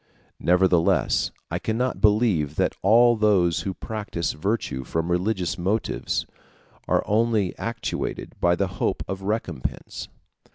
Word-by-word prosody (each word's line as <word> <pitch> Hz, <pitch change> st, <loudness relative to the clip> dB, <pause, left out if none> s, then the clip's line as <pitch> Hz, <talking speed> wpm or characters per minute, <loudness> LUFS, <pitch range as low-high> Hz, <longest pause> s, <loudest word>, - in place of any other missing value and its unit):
Nevertheless 90 Hz, -1 st, +3 dB, 0.2 s
I -, -, -1 dB
cannot 125 Hz, +3 st, -1 dB
believe 105 Hz, -, +3 dB
that -, -, +1 dB
all 120 Hz, +4 st, +6 dB
those 100 Hz, -6 st, +3 dB
who 95 Hz, -2 st, -4 dB
practise 105 Hz, -6 st, -3 dB
virtue 90 Hz, -, -2 dB
from 80 Hz, +6 st, -2 dB
religious 90 Hz, -1 st, 0 dB
motives 100 Hz, +5 st, -1 dB, 0.6 s
are -, -, +2 dB
only 110 Hz, -3 st, +1 dB
actuated 115 Hz, 0 st, -4 dB
by 85 Hz, 0 st, +4 dB
the 100 Hz, -, +1 dB, 0.2 s
hope -, -, 0 dB
of 95 Hz, 0 st, -4 dB
a -, -, -8 dB
recompense. 95 Hz, -, -3 dB
95 Hz, 125 wpm, -24 LUFS, 85-110 Hz, 0.6 s, all